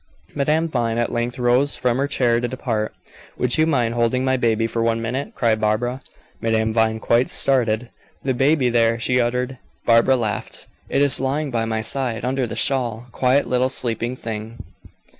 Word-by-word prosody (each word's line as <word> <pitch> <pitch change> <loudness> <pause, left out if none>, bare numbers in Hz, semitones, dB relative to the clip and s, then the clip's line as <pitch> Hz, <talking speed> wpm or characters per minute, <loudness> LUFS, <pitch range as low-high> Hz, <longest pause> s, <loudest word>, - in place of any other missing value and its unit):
Madame 150 +3 +1
Vine 120 -6 -1
at 120 - 0
length 120 +1 -2
rose 125 +3 +2
from 125 -1 0
her 140 - +1
chair 120 -4 +1
to 120 - -2
depart. 115 -4 -3 0.4
"Would 125 +4 +1
you 155 - +4
mind 125 -7 +1
holding 120 +2 +1
my 130 0 +2
baby 115 -3 +1
for 115 +1 -2
one 115 0 +1
minute?" 125 +5 -4
cried 110 -3 +1
Barbara. 120 +5 0 0.4
Madame 110 -1 0
Vine 110 -1 +1
quite 120 +3 +2
started. 120 -3 +2 0.3
"The 130 - 0
baby 135 +1 +2
there!" 115 -1 +2
she 125 +2 +1
uttered. 125 +2 -2 0.3
Barbara 115 +3 +4
laughed. 110 -5 -3 0.2
"It 140 - +2
is 140 - +4
lying 140 +2 -1
by 115 -2 0
my 110 -1 -1
side, 120 -1 -2
under 130 0 -1
the 115 - -6
shawl, 120 -2 0
quiet 130 +3 +2
little 125 +1 +1
sleeping 120 -1 -2
thing." 115 -1 -6
120 Hz, 180 wpm, -21 LUFS, 115-130 Hz, 0.4 s, you